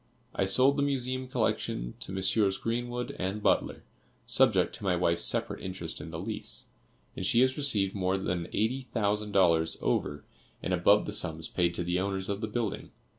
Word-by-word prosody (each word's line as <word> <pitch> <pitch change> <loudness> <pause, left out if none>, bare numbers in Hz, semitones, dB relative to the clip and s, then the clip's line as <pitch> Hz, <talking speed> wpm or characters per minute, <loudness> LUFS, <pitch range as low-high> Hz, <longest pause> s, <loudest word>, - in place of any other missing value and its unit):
I 95 - +1
sold 130 +9 +5
the - - +1
Museum 130 -2 -1
collection - - -1
to - - -7
Messrs. 95 +1 +1
Greenwood 120 +1 -3
and 95 +3 -3
Butler, - - +1 0.4
subject - - +3
to - - -12
my 95 -2 +2
wife's 85 -1 +1
separate - - 0
interest 90 -3 -5
in - - -8
the 80 - -6
lease, 90 - -4 0.5
and - - -5
she 115 +6 +3
has 130 0 +3
received 105 -10 +1
more 95 -1 0
than 85 -2 -2
eighty 125 +5 -1
thousand 105 -1 0
dollars 85 -4 +3
over 75 0 -1 0.4
and 90 - -1
above 100 +4 +4
the - - -4
sums 80 -6 -1
paid 85 -1 0
to 85 - -2
the 90 +1 0
owners 95 0 -2
of 100 +1 -2
the 110 - -2
building. 110 -1 -3
95 Hz, 180 wpm, -29 LUFS, 90-115 Hz, 0.5 s, sold